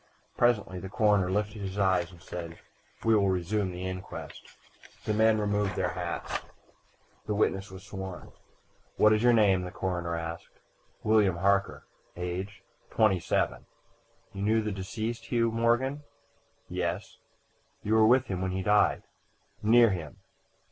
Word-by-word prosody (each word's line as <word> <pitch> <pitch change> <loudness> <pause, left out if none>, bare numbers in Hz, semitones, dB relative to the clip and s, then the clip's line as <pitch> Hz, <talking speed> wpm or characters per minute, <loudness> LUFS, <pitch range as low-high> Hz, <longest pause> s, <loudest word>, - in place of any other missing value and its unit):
Presently 105 -6 +1
the 95 - -7
coroner 105 -3 +2
lifted 105 +2 -2
his 95 0 -5
eyes 95 -3 +2
and 85 - -15
said: 85 -2 -7 0.5
"We 115 - +5
will 100 -2 +3
resume 95 +2 0
the 90 +1 -6
inquest." 95 0 -8 0.5
The 110 - 0
men 110 +1 +4
removed 105 -1 0
their - - 0
hats. - - -3 0.9
The 105 - -1
witness 100 -1 0
was 95 0 -11
sworn. 95 -2 -7 0.7
"What 105 0 +6
is 110 - +2
your 120 +1 +5
name?" 100 -5 +4
the 90 - -5
coroner 90 -2 -3
asked. 85 0 -7 0.4
"William 105 -4 +3
Harker." 100 +2 +1 0.3
"Age?" 90 +3 -5 0.3
"Twenty 105 -5 +3
seven." - - -1 0.7
"You 100 - -6
knew 110 +2 +2
the 105 - -2
deceased, 110 +4 -4
Hugh 115 -2 +1
Morgan?" 120 +5 +1 0.7
"Yes." 90 +2 -3 0.6
"You 105 - 0
were 110 -1 +6
with 130 +2 +5
him 95 -5 -3
when 95 0 -1
he 95 0 -2
died?" 105 +2 +3 0.6
"Near 115 +1 +6
him." 80 -6 -5
100 Hz, 145 wpm, -29 LUFS, 95-110 Hz, 0.9 s, What